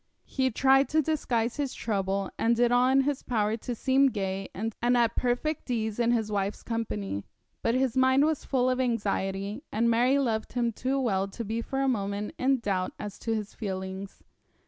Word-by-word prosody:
He 260 -1 0
tried 270 +3 +4
to 310 0 +2
disguise 245 -6 0
his 285 -3 -2
trouble, 195 -2 -1
and 230 +1 +2
did 240 0 +3
all 245 +1 +4
in 270 +1 +5
his 280 0 -1
power 215 -2 0
to 240 +2 -5
seem 270 +3 +3
gay 195 -3 -3
and 225 +3 -4
at 240 -1 +3
perfect 255 +5 -1
ease 220 -2 -1
in 235 -1 +2
his 225 -3 +1
wife's 200 0 -2
company; 105 - -3 0.4
but 230 - +1
his 260 -2 +1
mind 260 +2 +4
was 315 -2 0
full 255 -2 +1
of 255 0 +1
anxiety, 205 -2 -1
and 235 +2 +2
Mary 250 +4 +3
loved 225 -5 -1
him 240 -1 +1
too 260 +5 -1
well 195 -7 +1
to 225 +4 -6
be 225 +3 -2
for 270 +3 -3
a 270 - +2
moment 205 -3 -1
in 265 +1 +3
doubt 190 -4 -1
as 210 -1 -7
to 225 -1 -1
his 210 -1 -4
feelings. 190 -1 -6
230 Hz, 190 wpm, -28 LUFS, 205-260 Hz, 0.4 s, in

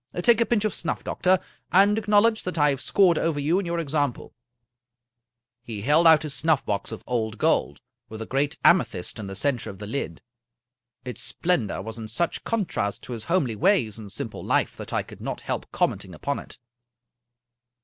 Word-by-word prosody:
Take 235 -1 +5
a 230 - +2
pinch 220 -3 +1
of 215 - 0
snuff, 170 - -2
doctor, 185 +1 +2 0.3
and 200 +3 +5
acknowledge 215 +1 +3
that 180 -2 -4
I 150 -1 +4
have 135 - -3
scored 185 -5 +3
over 160 -3 0
you 160 +6 +2
in 195 - -4
your 170 0 -1
example." 145 -5 -2 1.3
He 115 -4 -6
held 155 +6 +5
out 160 -1 +7
his 150 -2 -3
snuffbox 140 -12 0
of 110 - -8
pld 115 -3 -2
gold, - - +1 0.3
with 110 - -8
a 110 - -4
great 140 +5 -1
ame 175 - +7
thyst 90 +4 -7
in 105 - -5
the 95 - -6
center 125 +3 -1
of 95 - -9
the 105 - -7
lid. 105 - -4 0.8
Its 125 -3 -5
splendor 130 - -1
was 110 +2 -7
in 110 - -6
such 145 +10 -1
contrast 170 - -2
to 125 - -6
his 110 -2 -6
homely 145 -10 +1
ways 135 - +2
and 105 -2 -9
simple - - -5
life - - +1
that - - -8
I - - 0
could - - -13
not - - -4
help - - -4
commenting 90 -3 -1
upon 140 - -2
it. - - -12
145 Hz, 190 wpm, -25 LUFS, 110-180 Hz, 1.3 s, out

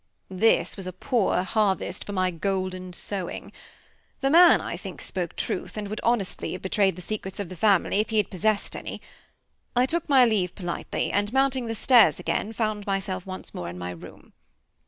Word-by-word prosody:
This 210 +4 +2
was 190 -2 -5
a 185 - -5
poor 195 -2 +1
harvest 205 -1 0
for - - -6
my 185 -2 +1
golden 185 +1 -3
sowing. 185 +1 -5 0.7
The 270 0 +2
man, 345 +2 +8
I - - -4
think, - - -8
spoke - - -4
truth, - - -3
and 205 -1 -4
would 215 - -4
honestly 230 -5 0
have 185 - -7
betrayed 190 0 +2
the 180 - -9
secrets 195 -1 -5
of 200 -4 -4
the 185 - -8
family, 200 +1 +3
if 215 - 0
he 220 - 0
had 210 - +1
possessed 205 +3 0
any. - - -6 0.8
I 245 +1 +4
took 330 +4 -1
my 265 -3 +7
leave 200 -6 0
politely; 175 -3 -3
and 205 +1 0
mounting 265 -2 +1
the 225 - -3
stairs 240 +1 +5
again, 210 - -1
I - - -8
found 215 -2 -2
myself 195 -1 -2
once 185 0 -8
more 85 - -5
in 90 - -8
my 90 0 -5
room. 85 - -12
200 Hz, 195 wpm, -26 LUFS, 185-225 Hz, 0.8 s, man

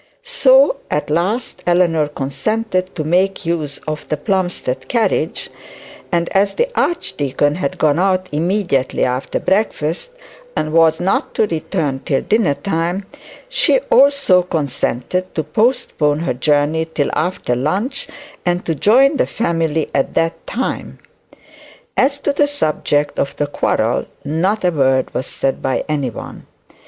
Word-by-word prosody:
So 280 - +4
at 150 0 -2
last 190 +10 -1
Eleanor 170 -3 +3
consented 185 - -2
to 155 - -2
make 185 +4 +1
use 155 -4 -2
of 155 -1 -5
the 155 - 0
Plumstead 180 - -1
carriage; 235 -3 0 0.6
and 170 -1 +1
as 195 +1 +1
the 485 +1 +1
archdeacon 145 - 0
had 150 -4 -3
gone 155 +1 +2
out 185 0 +1
immediately 170 -3 0
after 125 +1 -2
breakfast 190 - -1 0.4
and 155 0 -2
was 160 -1 +4
not 185 +2 0
to - - +3
return 160 -5 -2
till 135 0 -1
dinner 210 -10 +2
time, 175 +2 -2 0.4
she - - +3
also 275 -10 +5
consented 165 +1 -2
to 160 - 0
postpone 155 - +1
her 170 - -1
journey 150 +4 +1
till 145 -3 0
after 160 -7 -1
lunch, 200 - -2 0.4
and 175 0 0
to 165 - 0
join 260 - +4
the - - +1
family 165 -6 -1
at 135 - 0
that 165 0 -1
time. 260 - -3 1.0
As 280 +1 +2
to 285 - 0
the 290 +1 +3
subject 155 - 0
of 140 - -1
the 145 - 0
quarrel 145 - 0 0.2
not 185 +8 0
a 180 - +3
word 135 -4 +1
was 130 - -2
said 135 - -2
by 130 - -1
any 145 -4 -1
one. 115 - -9
170 Hz, 140 wpm, -18 LUFS, 150-200 Hz, 1.0 s, also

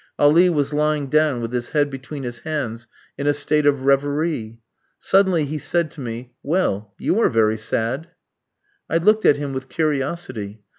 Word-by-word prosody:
Ali 165 +5 +5
was 145 -3 0
lying 150 -2 0
down 150 -5 +2
with 115 +1 -4
his 120 -1 -2
head 145 -2 +1
between 135 +1 -7
his 120 -1 -6
hands 120 -7 -4 0.3
in 140 - -1
a 145 - +3
state 150 +1 +1
of 140 -2 +2
reverie. 140 -4 0 0.3
Suddenly 190 -5 +3
he 150 +2 -4
said 170 +1 -1
to 150 - -10
me: 120 0 -6
"Well, 110 - -1
you 210 - 0
are - - +4
very 110 -1 +2
sad!" 120 +8 -2 0.8
I 165 - +2
looked 215 +6 +3
at 145 - +6
him 145 -1 -4
with 130 0 -5
curiosity. 135 -9 -3
145 Hz, 170 wpm, -21 LUFS, 120-155 Hz, 0.8 s, at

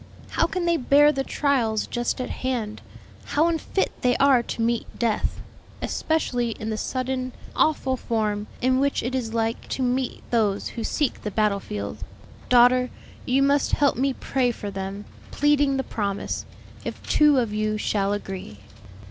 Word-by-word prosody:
How - - +2
can 365 -2 -2
they 340 -1 +3
bear 290 +2 +5
the 270 -2 -1
trials 245 -8 +1
just 240 +1 -2
at 255 - -3
hand? 235 -5 -3 0.4
How 310 +3 +2
unfit 335 +3 0
they 250 -1 +3
are 275 -3 +5
to 235 - -5
meet 235 0 0
death, 230 -3 0 0.4
especially 245 -7 -1
in 220 +1 -3
the - - -1
sudden, 255 +1 -2 0.2
awful 265 -4 +2
form 215 -3 -1 0.2
in 255 0 +3
which 280 +1 +1
it 245 +3 -2
is 230 -3 -2
like 225 0 -1
to 265 - -1
meet 250 0 -1
those 210 -4 +1
who 230 - -5
seek 295 +2 -1
the 210 - -3
battle 210 -1 +1
field. 105 - -5 0.5
Daughter, 250 +1 +5 0.4
you 265 +2 +3
must 280 +1 +2
help 285 -1 +3
me 270 +3 +1
pray 255 -1 0
for 210 -4 -5
them, 195 +1 -5 0.2
pleading 290 -1 +2
the 265 - 0
promise, 200 -5 -3 0.4
'If - - -7
two 300 -2 +5
of 230 -4 +1
you 215 0 0
shall 200 -1 0
agree.'" 195 - -5
245 Hz, 165 wpm, -24 LUFS, 215-275 Hz, 0.5 s, bear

